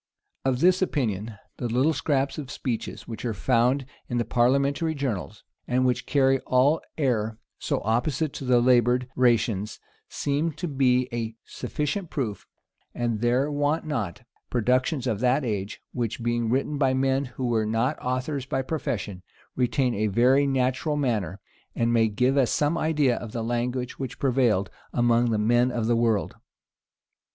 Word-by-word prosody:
Of 130 -1 +1
this 185 +1 +4
opinion, 115 - -1 0.2
the 120 - -2
little 130 +7 +2
scraps 140 -1 0
of 140 -3 -7
speeches 130 -5 -4
which 115 -2 -7
are 115 -3 -2
found 125 +5 +2 0.2
in 120 - -1
the 120 - 0
parliamentary 140 +6 +2
journals, 110 -6 -4 0.2
and 130 +1 +2
which 125 -1 0
carry 135 -2 +3
all 135 +5 +3 0.2
air 115 -7 0 0.2
so - - -1
opposite 125 +7 0
to - - -6
the 125 -2 +4
labored: 125 0 +3
rations, 115 -4 +1 0.3
seem 150 +3 -1
to 175 - -4
be 130 -3 +2
a 115 -1 -3
sufficient 155 +4 -3
proof; 115 -8 -4 0.5
and 115 -3 -1
there 125 +5 +2
want 145 +3 0
not 115 - -3 0.3
productions 130 +3 +1
of 110 -5 -1
that 130 +3 +2
age, 105 -2 -3
which, 120 -1 -3
being 120 -1 0
written 140 +4 0
by 130 -2 +3
men 135 +1 +1
who 130 0 -5
were 115 -3 +1
not 115 +7 0
authors 130 +2 -2
by 135 -2 -1
profession, 105 - -3 0.3
retain 125 0 +1
a 110 +1 0
very 125 +7 +4
natural 130 +3 0
manner, 105 - -1 0.4
and 115 0 +1
may 115 -1 +4
give 125 +6 +1
us 130 -4 +3
some 150 +2 +1
idea 150 -6 +2
of 115 -3 -7
the 115 - -2
language 125 +2 -2
which 130 -2 -5
prevailed 120 -7 +1 0.2
among 120 0 +3 0.2
men 120 +2 +4
of 120 -3 -2
the 120 +1 +2
world. 115 -3 +1
125 Hz, 160 wpm, -26 LUFS, 115-140 Hz, 0.5 s, this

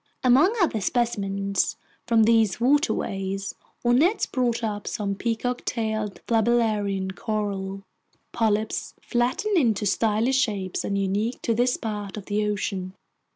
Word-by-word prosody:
Among 275 - +5
other 310 - +1
specimens 200 -4 0 0.3
from 230 -2 +4
these 220 -3 +3
waterways, 195 - 0 0.3
our 240 - +4
nets 355 - +3
brought 245 -3 -1
up 205 -2 -3
some 200 -2 -2
peacock 235 +4 -2
tailed 220 -3 -2
flabellarian 215 -4 +1
coral, 195 -2 -3 0.5
polyps 220 -1 -1
flattened 260 - 0
into 220 -7 +1
stylish 225 +5 +2
shapes 195 -6 -1
and 200 - -1
unique 200 +5 -1
to 230 - +1
this 245 +2 +2
part 210 -2 -5
of 205 - -7
the 210 0 0
ocean. 195 -2 -3
215 Hz, 125 wpm, -25 LUFS, 200-240 Hz, 0.5 s, Among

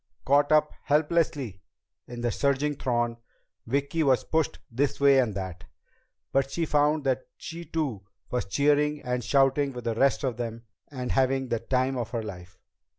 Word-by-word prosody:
Caught 145 +2 +3
up 150 0 +4
helplessly 145 - +1 0.5
in 120 0 -7
the 120 -1 0
surging 140 +4 +1
throng, 120 -3 -1 0.5
Vicki 140 +6 0
was 135 -4 +3
pushed 160 -2 0
this 140 +4 0
way 140 -1 +6
and 115 -6 +1
that. 95 -2 -6 0.7
But 135 0 +1
she 165 +4 -1
found 150 0 +2
that 130 -1 -1
she 170 +1 -7
too 130 -14 -3 0.2
was 125 - -1
cheering 145 +6 +2
and 125 -1 -2
shouting 135 +2 +2
with 125 -1 -7
the 115 -1 -1
rest 135 +5 +2
of 125 -4 -1
them 115 -1 -5 0.2
and 125 -3 -4
having 135 0 +1
the 115 - 0
time 130 +2 0
of 115 -2 -3
her 115 -2 -3
life. 90 -3 -9
135 Hz, 165 wpm, -27 LUFS, 120-145 Hz, 0.7 s, way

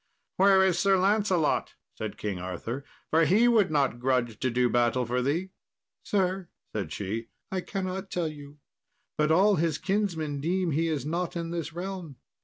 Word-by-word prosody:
"Where 190 0 +6
is 180 -2 +2
Sir 195 0 +4
Lancelot?" 190 -4 +1 0.2
said - - -5
King 100 -4 -3
Arthur, 95 +9 -5 0.3
"for 165 +1 +5
he 210 +9 +4
would 225 -5 +4
not 140 -5 +1
grudge 125 -3 0
to 130 - +1
do 125 +1 +2
battle 120 +1 +2
for 125 +2 0
thee." 165 +9 -1 0.5
"Sir," 190 -2 -1 0.2
said 100 -7 -3
she, 105 +6 -4 0.2
"I 190 -1 -1
cannot 190 0 -4
tell 175 -3 -1
you, 145 -1 -9 0.6
but 150 0 +1
all 195 +5 +5
his 160 -1 +1
kinsmen 170 -8 -1
deem 180 +2 0
he 160 +3 +1
is 150 -5 -2
not 170 +3 -2
in 170 -1 -3
this 165 -2 -3
realm." 180 -4 -6
165 Hz, 170 wpm, -28 LUFS, 130-190 Hz, 0.6 s, Where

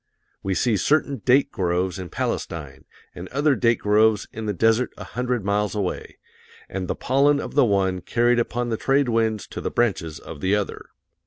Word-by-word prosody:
We 95 -1 -1
see 115 0 +2
certain 140 - +1
date 135 +2 +4
groves 90 -1 -1
in 90 -2 -6
Palestine, 75 -5 -4 0.3
and 90 +1 -8
other 145 +5 +2
date 115 -2 +2
groves 105 +1 +3
in 110 -1 -5
the - - +1
desert 115 +5 +2
a 105 - -7
hundred 125 +1 -3
miles 105 +1 0
away, 100 -3 -3 0.5
and 95 -1 -4
the - - -2
pollen 140 +3 +2
of - - -6
the 145 - +5
one 95 -3 +1
carried 120 +5 +2
upon 120 +1 -1
the 110 - -1
trade 135 +1 +2
winds 110 -2 0
to - - -6
the - - -2
branches 90 -9 -1
of 70 - -10
the 95 +2 +2
other. 105 -2 -3
110 Hz, 185 wpm, -23 LUFS, 95-125 Hz, 0.5 s, the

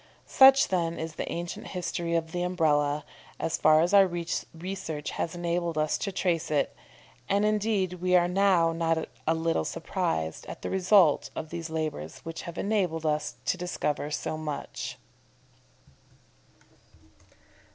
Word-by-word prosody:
Such, 270 0 +7
then, 170 -3 0
is 160 0 -5
the - - -5
ancient 170 0 -5
history 170 -2 -3
of 165 -1 -1
the 175 - -2
Umbrella, 150 -5 +1 0.3
as 165 - -1
far 155 0 +5
as 175 +4 +1
our 195 -1 +7
research 170 -1 -4
has 165 - -3
enabled 170 -1 -1
us 155 0 +1
to 200 - -2
trace 175 -3 0
it, 150 -2 0 0.5
and, 200 +1 +2
indeed, 210 -3 +1
we 180 0 +3
are 175 -1 +5
now 180 -3 +3
not 165 -1 0 0.2
a 160 - +3
little 165 - 0
surprised 80 0 -3
at - - -8
the - - -3
result 185 -4 +4
of 155 - -6
those 170 -1 -5
labours 155 - -4
which 165 0 -5
have 170 - -9
enabled 185 -6 0
us 150 -1 -1
to - - +1
discover 150 -5 -2
so 155 +1 -3
much. 150 -2 -5
170 Hz, 145 wpm, -28 LUFS, 155-180 Hz, 0.5 s, Such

